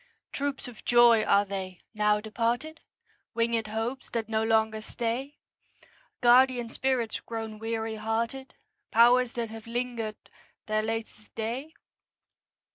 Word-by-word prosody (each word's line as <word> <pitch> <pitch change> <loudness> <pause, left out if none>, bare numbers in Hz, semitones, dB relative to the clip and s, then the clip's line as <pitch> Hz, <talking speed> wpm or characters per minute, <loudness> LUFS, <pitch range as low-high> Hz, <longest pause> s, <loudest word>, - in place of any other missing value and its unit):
Troops 280 -1 -3
of 240 -3 -12
joys 240 -2 +5
are 200 +1 +4
they, 190 -2 -6
now 210 -1 +2
departed? 235 +8 -2 0.5
Winged 230 -1 +1
hopes 225 +5 -3
that 230 -2 -2
no 220 -1 0
longer 220 -1 +2
stay? 240 +5 -3 0.8
Guardian 245 -1 +5
spirits 255 -4 0
grown 225 -2 -6
weary 225 0 -3
hearted? 230 +5 -3 0.3
Powers 240 +2 +5
that 230 -2 -3
have 225 0 -9
linger'd 230 -2 -4 0.3
their 215 0 +1
latest 220 -1 -5
day? 245 +8 -4
230 Hz, 120 wpm, -28 LUFS, 220-245 Hz, 0.8 s, joys